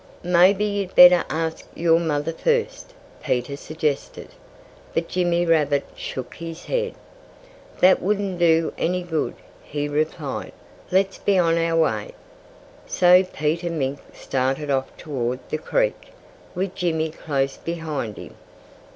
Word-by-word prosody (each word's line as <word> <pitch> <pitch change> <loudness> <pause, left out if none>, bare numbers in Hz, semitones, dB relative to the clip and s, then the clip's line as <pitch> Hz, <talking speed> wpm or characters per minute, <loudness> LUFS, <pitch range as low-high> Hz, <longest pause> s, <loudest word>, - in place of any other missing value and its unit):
"Maybe 180 +4 +4
you'd 200 -2 -3
better 180 0 +9
ask 160 0 -2
your 165 0 +3
mother 160 -1 -1
first," - - -1 0.3
Peter 125 +3 -1
suggested. 155 -1 -3 0.7
But 165 0 0
Jimmy 175 -1 +1
Rabbit 150 -4 +2
shook 130 -2 -6
his 165 +1 -8
head. 480 -1 -2 0.9
"That 185 +1 +6
wouldn't 195 -2 -1
do 165 -1 +3
any 180 +1 0
good," 160 -3 -2 0.3
he 145 0 -4
replied. 150 -1 -3 0.4
"Let's 190 +1 +1
be 200 -1 +2
on 170 -2 +3
our 165 0 +1
way!" 165 - 0 0.7
So 180 +1 +5
Peter 165 0 -2
Mink 140 -4 -2
started 135 +3 -2
off 135 -1 0
toward 130 -5 -3
the 155 - -1
creek, - - -1 0.5
with 185 +1 -2
Jimmy 160 -4 -1
close 135 -4 -2
behind 155 -10 -4
him. - - -10
165 Hz, 125 wpm, -23 LUFS, 150-180 Hz, 0.9 s, better